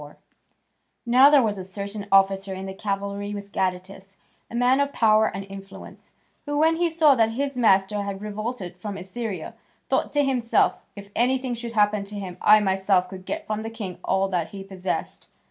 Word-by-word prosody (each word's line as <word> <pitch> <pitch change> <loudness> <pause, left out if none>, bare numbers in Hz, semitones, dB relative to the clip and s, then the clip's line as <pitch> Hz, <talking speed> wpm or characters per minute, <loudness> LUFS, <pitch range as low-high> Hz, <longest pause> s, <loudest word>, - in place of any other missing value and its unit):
4] 145 0 -12 0.9
Now 255 +4 +7
there 290 -3 +5
was 205 -3 -1
a - - -5
certain 200 +2 -6
officer 195 0 +3
in 190 +1 -6
the 190 - -6
cavalry 200 0 -4
with 200 0 -8
Gadatas, 190 +1 -3 0.3
a - - -8
man 250 +3 +3
of 280 0 +1
power 220 -1 +4
and 195 +1 -5
influence, 195 0 -11 0.4
who, 290 0 -1
when 320 +2 +3
he 345 0 +1
saw 320 -3 +5
that 225 -3 +2
his 275 +2 -2
master 205 -3 +3
had 200 -1 -4
revolted 210 -2 -5
from 200 +1 -6
Assyria, 195 +2 -5 0.4
thought - - +1
to 290 -1 +2
himself, 250 -4 +2 0.2
"If 200 0 -11
anything 255 +1 +1
should 235 0 -6
happen 210 -1 +2
to 205 +1 -7
him, 185 -3 -7
I 215 0 +7
myself 190 -2 +1
could 185 -1 -10
get - - -4
from 215 0 -3
the 225 - -5
king 205 -6 -7
all 190 0 +1
that 175 -4 -1
he 195 -1 -9
possessed." 190 -1 -4
205 Hz, 190 wpm, -24 LUFS, 195-235 Hz, 0.9 s, Now